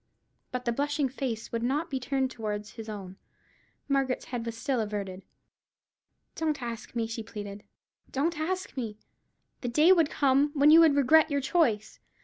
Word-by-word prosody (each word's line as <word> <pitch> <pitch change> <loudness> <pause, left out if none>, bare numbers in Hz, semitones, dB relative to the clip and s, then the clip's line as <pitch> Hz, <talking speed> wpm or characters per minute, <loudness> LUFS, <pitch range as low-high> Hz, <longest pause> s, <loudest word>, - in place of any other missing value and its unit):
But 250 0 -4
the 235 - +1
blushing 285 +2 0
face 250 -4 -4
would 230 - -2
not 290 +7 -1
be 265 - -1
turned 265 0 -1
towards 210 -3 -4
his 225 -1 -9
own. 195 -3 -7 0.7
Margaret's 270 -2 0
head 245 -2 -4
was 230 0 -4
still 260 +1 -1
averted. 200 -3 -4 1.1
"Don't 315 -2 -1
ask 235 0 -6
me," 230 -1 0
she 225 0 -5
pleaded; 205 -2 -8 0.5
"don't 300 +4 0
ask 370 +3 -3
me. 225 -5 -4 0.6
The 245 - -2
day 305 +9 +5
would 330 -5 +5
come 280 0 +3
when 290 +1 +6
you 325 - +9
would 320 -4 +6
regret 310 +3 +5
your 285 -1 +1
choice. 255 -8 +1
260 Hz, 165 wpm, -28 LUFS, 225-290 Hz, 1.1 s, you